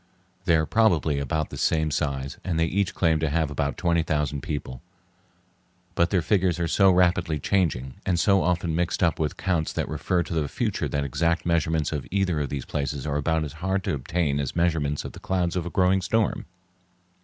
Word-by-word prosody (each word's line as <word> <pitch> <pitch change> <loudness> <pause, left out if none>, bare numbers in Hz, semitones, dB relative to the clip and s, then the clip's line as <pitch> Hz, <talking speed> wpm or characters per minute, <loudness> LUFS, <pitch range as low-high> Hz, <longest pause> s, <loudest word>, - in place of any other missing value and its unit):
They 85 - +4
are 80 -1 +2
probably 85 -9 +2
about 75 +3 -2
the - - -6
same 80 -1 +1
size 70 -2 -2
and 85 -3 -1
they 80 - +3
each 95 +4 -1
claim 80 -3 +2
to 80 0 0
have 80 -1 0
about 70 -1 -2
twenty 85 -2 +2
thousand 75 -3 -1
people; 75 -6 -5 1.1
but 85 0 +2
their 90 -4 +1
figures 95 -3 +1
are 85 - 0
so 95 +3 +4
rapidly 90 -3 +2
changing, 70 -6 0
and 90 -3 0
so 100 -1 +4
often 85 -2 0
mixed 85 +2 0
up 80 -4 +2
with 75 -2 -1
counts 85 -4 0
that - - -2
refer 85 +4 0
to 85 - -6
the 80 -3 0
future - - -2
that 70 -1 -1
exact 85 +5 0
measurements 80 -2 +1
of 75 -4 -4
either 95 -5 0
of 70 -2 -2
these 70 -2 -4
places 70 -1 -3
are 75 -1 -1
about 80 +2 0
as 75 - -6
hard 95 +1 0
to - - -1
obtain 70 +1 -1
as 70 -2 -3
measurements 80 -4 0
of - - -5
the - - -11
clouds 90 -2 -1
of 90 -2 -2
a - - -3
growing 95 +1 +2
storm. 110 +4 0
80 Hz, 205 wpm, -25 LUFS, 75-90 Hz, 1.1 s, They